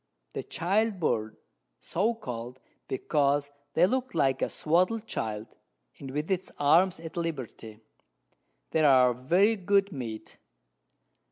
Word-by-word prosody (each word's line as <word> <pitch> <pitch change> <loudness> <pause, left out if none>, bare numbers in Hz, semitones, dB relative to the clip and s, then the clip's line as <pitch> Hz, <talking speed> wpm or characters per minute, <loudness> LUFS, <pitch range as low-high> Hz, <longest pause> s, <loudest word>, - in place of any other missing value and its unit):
The - - -3
Child 200 +4 0
Bird, 110 -8 -1 0.4
so 215 +7 0
call'd, 125 - -7 0.3
because 145 +1 +1 0.2
they 170 - +6
look 255 +1 -1
like 135 -4 +2
a - - +1
swadled 185 +8 +1
Child, 110 - -4 0.5
with 145 +5 -4
its 185 -1 -1
Arms 170 +6 +4
at 165 +1 -9
Liberty: 130 -9 -5 0.9
They 160 - +2
are 130 -4 +6
very 175 - +3
good 200 0 +2
Meat. 120 -7 -7
155 Hz, 115 wpm, -28 LUFS, 130-190 Hz, 0.9 s, they